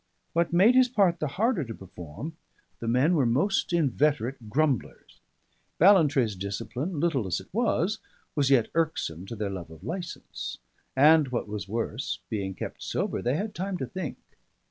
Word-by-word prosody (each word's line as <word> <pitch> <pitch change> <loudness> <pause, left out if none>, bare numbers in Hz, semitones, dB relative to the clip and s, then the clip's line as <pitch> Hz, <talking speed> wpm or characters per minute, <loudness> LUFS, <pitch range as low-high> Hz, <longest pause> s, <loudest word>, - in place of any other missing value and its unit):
What 170 0 +1
made 190 +8 +6
his 255 -1 +5
part 195 -8 +3
the 155 - 0
harder 205 - +1
to 115 -3 -7
perform, 95 - -8 0.4
the 115 - -5
men 130 +9 +3
were 140 -7 +3
most 165 - +1
inveterate 140 -6 +1
grumblers: 140 -2 -1 0.6
Ballantrae's 150 - +5
discipline, 120 - -4
little 145 - +1
as 90 - 0
it 95 - -13
was, 215 -3 +1 0.3
was 140 -3 +2
yet 130 -5 +4
irksome 150 - -1
to 115 - -6
their 105 -2 -2
love 90 -4 -6
of 80 +1 -13
licence; 175 - -5 0.4
and, 150 +2 +6
what 125 -3 -2
was 105 -2 -5
worse, 115 +3 -2
being 95 -3 -2
kept - - -6
sober - - -2
they 125 +3 +1
had 205 +5 -2
time 190 0 -3
to - - -3
think. 185 -7 -5
145 Hz, 165 wpm, -27 LUFS, 110-175 Hz, 0.6 s, made